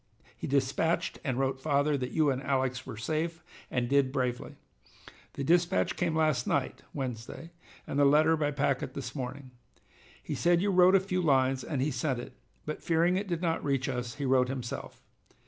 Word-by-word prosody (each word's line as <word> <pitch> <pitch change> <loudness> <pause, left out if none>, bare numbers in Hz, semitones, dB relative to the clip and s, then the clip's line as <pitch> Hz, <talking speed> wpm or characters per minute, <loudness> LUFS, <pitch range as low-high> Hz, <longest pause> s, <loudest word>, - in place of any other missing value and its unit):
He - - -6
dispatched 145 +5 0
and 130 -5 -1
wrote 135 0 0
father 145 +1 +1
that 125 -2 -2
you 155 -1 +2
and 130 0 -2
Alex 130 -2 -1
were 120 -5 -7
safe 160 +7 -2 0.3
and 125 -1 -1
did 140 0 +3
bravely. 125 -3 -2 0.8
The 140 - -4
dispatch 175 +5 +2
came 170 -3 0
last 155 -3 +1
night - - -1
(Wednesday) 130 +4 -6 0.3
and 140 - -2
the 145 - +6
letter 155 +3 +5
by 150 -2 0
packet 140 -2 -1
this 125 -3 -5
morning. 130 0 -6 0.7
He - - -4
said 175 0 +3
you 200 +2 +1
wrote 185 +1 +6
a - - +7
few 185 -1 -2
lines 135 -4 +2
and 135 -4 -2
he 150 - 0
sent 130 +1 -1
it, 120 - -8 0.3
but 155 - -5
fearing 170 +2 +2
it 200 +2 -2
did 175 -1 -2
not 165 -1 0
reach 135 -2 0
us, 125 -1 -3
he 140 -1 -4
wrote 130 -1 +3
himself. 125 -3 -6
140 Hz, 185 wpm, -30 LUFS, 130-160 Hz, 0.8 s, a